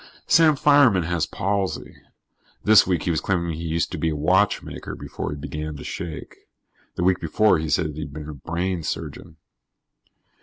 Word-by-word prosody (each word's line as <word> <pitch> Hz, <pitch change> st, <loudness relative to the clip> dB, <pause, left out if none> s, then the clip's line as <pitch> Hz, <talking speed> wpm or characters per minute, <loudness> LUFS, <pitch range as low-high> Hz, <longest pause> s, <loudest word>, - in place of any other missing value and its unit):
Sam 160 Hz, -2 st, +5 dB
Fireman 140 Hz, -, +5 dB
has 80 Hz, -1 st, -1 dB
palsy. 100 Hz, 0 st, -2 dB, 0.7 s
This 110 Hz, -3 st, +6 dB
week 90 Hz, -4 st, 0 dB
he 90 Hz, -, 0 dB
was 80 Hz, -2 st, 0 dB
claiming 85 Hz, -3 st, -1 dB
he 80 Hz, -, -6 dB
used 85 Hz, 0 st, -1 dB
to -, -, -4 dB
be 80 Hz, -, +1 dB
a 75 Hz, -, -2 dB
watchmaker 95 Hz, +7 st, 0 dB
before -, -, -6 dB
he 75 Hz, -, -5 dB
began 75 Hz, +1 st, -5 dB
to -, -, -9 dB
shake. 80 Hz, -2 st, -7 dB, 0.6 s
The -, -, -2 dB
week 95 Hz, 0 st, +3 dB
before, 105 Hz, -5 st, +2 dB
he'd 80 Hz, 0 st, -3 dB
said 80 Hz, -1 st, +1 dB
he 80 Hz, +1 st, -5 dB
was 75 Hz, +1 st, -8 dB
a 75 Hz, -, -6 dB
brain 85 Hz, +5 st, -3 dB
surgeon. 80 Hz, -, -6 dB
85 Hz, 175 wpm, -23 LUFS, 80-95 Hz, 0.7 s, This